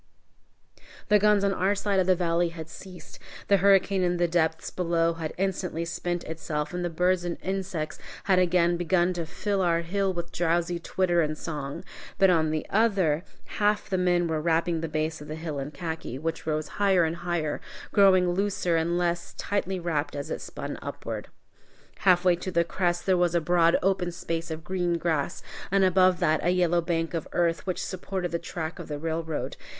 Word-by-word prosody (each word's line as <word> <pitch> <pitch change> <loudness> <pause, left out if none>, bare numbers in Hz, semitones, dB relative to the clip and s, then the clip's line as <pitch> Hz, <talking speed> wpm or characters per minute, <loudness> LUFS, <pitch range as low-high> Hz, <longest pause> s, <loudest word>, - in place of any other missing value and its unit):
The 210 0 +6
guns 210 0 +4
on 200 -1 +2
our 195 +2 +1
side 200 -1 0
of 185 - +2
the 185 - +5
valley 170 -1 +1
had 160 -1 -8
ceased, 185 -2 -11 0.3
the 200 - +6
hurricane 195 0 +4
in 175 -1 +1
the 175 0 +2
depths 160 -1 0
below 170 -2 +1
had 160 -2 -4
instantly 180 -3 -2
spent 175 +1 -3
itself, 155 -1 -4
and 180 0 -2
the 175 - -1
birds 180 +2 +1
and 175 -1 -3
insects 190 -4 -3 0.2
had 190 -2 +3
again 175 -1 +3
begun 175 +1 +2
to 170 -2 -4
fill 195 +3 -1
our 170 -2 +2
hill 195 +3 0
with 170 -1 -5
drowsy 170 0 0
twitter 175 0 +1
and 155 -1 -1
song. 145 -4 -5 0.3
But 195 -1 +5
on 160 -2 +2
the 155 0 -2
other, 195 -8 +2 0.2
half 205 -1 0
the 190 - +2
men 175 -1 +2
were 160 -1 -1
wrapping 165 0 +1
the 165 - -2
base 155 0 -2
of 150 - -9
the 155 - -5
hill 160 -3 -4
in 135 +1 -4
khaki, 160 -6 -5
which 165 +2 -4
rose 155 0 -1
higher 190 -3 +4
and 165 +1 -1
higher, 175 -3 -2 0.3
growing 185 -3 +5
looser 185 -2 0
and 170 +2 0
less 175 -1 -1
tightly 195 -2 -2
wrapt 160 -4 -2
as 140 0 -5
it - - -3
spun - - -6
upward. - - -6 0.7
Halfway 180 -1 +4
to 185 - -5
the 170 -2 +2
crest 175 0 -1
there 185 -1 +3
was 175 -1 +2
a - - +5
broad 170 0 +3
open 185 -2 +1
space 165 -1 -4
of 160 0 -5
green 175 -1 0
grass, 160 -4 -1 0.3
and 195 0 +3
above 185 -1 +4
that 155 -2 +2
a 175 - +2
yellow 175 -1 +2
bank 165 -1 -1
of 165 -2 -3
earth, 170 +1 0
which 185 - -2
supported 185 -1 -4
the 170 - -1
track 165 0 -5
of 170 - -7
the 150 - -4
railroad. 160 0 -3
175 Hz, 195 wpm, -27 LUFS, 165-185 Hz, 0.7 s, The